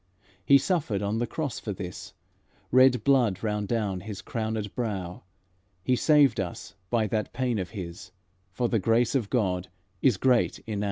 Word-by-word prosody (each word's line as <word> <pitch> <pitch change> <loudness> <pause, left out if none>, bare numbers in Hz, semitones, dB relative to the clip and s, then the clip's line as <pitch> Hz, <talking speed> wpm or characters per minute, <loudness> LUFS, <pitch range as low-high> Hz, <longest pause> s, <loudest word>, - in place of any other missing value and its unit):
He 140 +9 +7
suffered 140 - -1
on 105 +2 -1
the 120 - -1
cross 140 0 -3
for 105 - -4
this, 90 -1 -8 0.6
Red 130 -2 +5
blood 120 -8 +2
ran 105 -2 -1
from 105 -4 -1
His 100 -1 -7
crownèd 110 -2 -3
brow; 95 -7 -4 0.6
He 125 - +2
saved 145 +1 +4
us 95 +1 -5 0.2
by 115 -2 +2
that 105 +2 -2
pain 125 -3 -1
of 90 -2 -4
His, 90 -3 -8 0.4
For 120 +6 -1
the 115 -2 +1
grace 115 +4 +2
of 120 -7 0
God 95 -7 0 0.3
is 125 -8 +3
great 125 +3 +2
enow." 105 -2 -3
110 Hz, 165 wpm, -27 LUFS, 100-125 Hz, 0.6 s, He